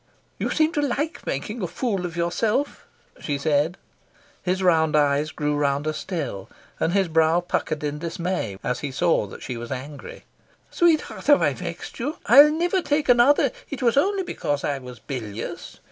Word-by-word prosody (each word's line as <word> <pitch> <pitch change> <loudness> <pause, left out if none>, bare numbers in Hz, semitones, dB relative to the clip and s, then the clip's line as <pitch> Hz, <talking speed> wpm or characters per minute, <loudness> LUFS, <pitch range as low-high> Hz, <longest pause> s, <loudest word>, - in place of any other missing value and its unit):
"You - - -1
seem 310 0 +2
to 295 - +1
like 290 +3 -2
making 210 - -3
a 180 - -1
fool 195 -4 -2
of 170 0 -9
yourself," 215 +11 -1 0.3
she 145 -2 -2
said. 150 +4 +1 0.6
His 185 +1 -1
round 160 -4 +3
eyes 145 0 +2
grew 150 -1 -2
rounder 145 +1 0
still, 145 - -5 0.3
and 165 - +1
his 195 -2 +2
brow 160 +1 +3
puckered 155 -3 -2
in 150 0 -3
dismay 170 - -3
as 125 +1 -1
he 145 - -4
saw 160 -5 +1
that - - -11
she 125 - -5
was 120 0 -7
angry. 145 - -7 0.5
"Sweetheart, 335 -5 +1
have 290 -1 +6
I - - +2
vexed - - -7
you? 280 +6 -3
I'll 280 +6 +9
never 350 +4 +1
take 295 -3 0
another. 245 +4 +5 0.2
It 280 -3 -5
was 235 -2 +3
only 385 +7 +2
because 145 - -3
I 140 -1 -1
was 125 -2 -10
bilious. 115 -6 -6
170 Hz, 175 wpm, -24 LUFS, -, 0.6 s, I'll